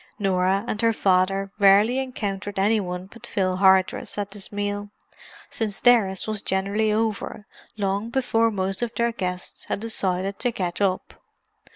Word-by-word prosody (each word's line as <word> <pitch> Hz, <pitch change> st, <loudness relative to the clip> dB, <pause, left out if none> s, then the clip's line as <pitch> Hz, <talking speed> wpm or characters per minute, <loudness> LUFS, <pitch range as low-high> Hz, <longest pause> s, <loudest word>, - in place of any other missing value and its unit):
Norah 195 Hz, 0 st, +1 dB
and 215 Hz, -, -2 dB
her 230 Hz, 0 st, +3 dB
father 195 Hz, 0 st, +1 dB
rarely 205 Hz, +6 st, +5 dB
encountered 205 Hz, -6 st, -4 dB
any 210 Hz, +3 st, +3 dB
one 180 Hz, -2 st, -4 dB
but 235 Hz, +5 st, -13 dB
Phil 185 Hz, -2 st, 0 dB
Hardress 190 Hz, 0 st, +3 dB
at 205 Hz, -1 st, -3 dB
this 200 Hz, -1 st, -8 dB
meal, 205 Hz, 0 st, -3 dB, 0.6 s
since 215 Hz, -3 st, -2 dB
theirs 220 Hz, -7 st, +3 dB
was 215 Hz, -2 st, -2 dB
generally 200 Hz, +3 st, 0 dB
over 215 Hz, -1 st, -2 dB, 0.3 s
long 200 Hz, +2 st, -1 dB
before 230 Hz, -2 st, +2 dB
most 195 Hz, -1 st, -2 dB
of 240 Hz, -2 st, -1 dB
their 235 Hz, 0 st, +1 dB
guests 180 Hz, -5 st, -5 dB
had -, -, -2 dB
decided 195 Hz, -3 st, -2 dB
to 245 Hz, -, +1 dB
get 180 Hz, -5 st, -3 dB
up. 190 Hz, -2 st, 0 dB
200 Hz, 155 wpm, -24 LUFS, 190-220 Hz, 0.6 s, rarely